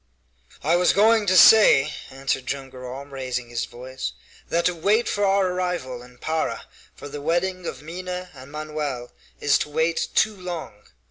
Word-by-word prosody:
"I 165 +4 +3
was 180 0 +4
going 220 +1 +4
to 185 0 +4
say," 205 -8 +7 0.2
answered 135 -1 -3
Joam 135 -1 -4
Garral, 130 +1 -8
raising 130 -3 -4
his 120 0 -2
voice, 125 - -6 0.4
"that 170 +1 +1
to 180 - +3
wait 205 +8 +2
for 205 - 0
our 195 -1 +3
arrival 180 -9 -3
in 125 0 -15
Para 160 +4 -2 0.3
for - - -9
the 145 0 -7
wedding 175 +3 -1
of 130 - -6
Minha 180 +2 -6
and 135 0 -12
Manoel 150 -5 -4 0.3
is 145 -1 +3
to - - -3
wait 160 +2 0
too 215 -1 +3
long. 180 - -6
155 Hz, 170 wpm, -24 LUFS, 130-180 Hz, 0.4 s, say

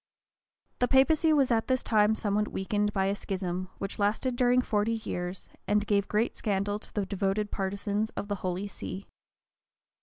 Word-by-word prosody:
The 245 - +3
papacy 305 +5 +4
was 275 -4 +3
at 225 -1 +2
this 260 -1 +1
time 215 -1 +3
somewhat 210 0 0
weakened 205 +2 -1
by 195 -2 +1
a 195 - +1
schism, 185 -2 -3
which 195 - -4
lasted 220 +5 +1
during 245 0 +4
forty 215 0 +1
years, 180 -5 -4 0.2
and 210 0 +2
gave 200 -1 +1
great 215 +3 0
scandal 205 -1 -1
to - - -14
the 205 -2 -1
devoted 200 +1 -1
partisans 200 +2 -1
of - - -3
the 205 - -1
holy 185 +2 -2
see. 200 -1 -7
205 Hz, 170 wpm, -29 LUFS, 195-225 Hz, 0.2 s, papacy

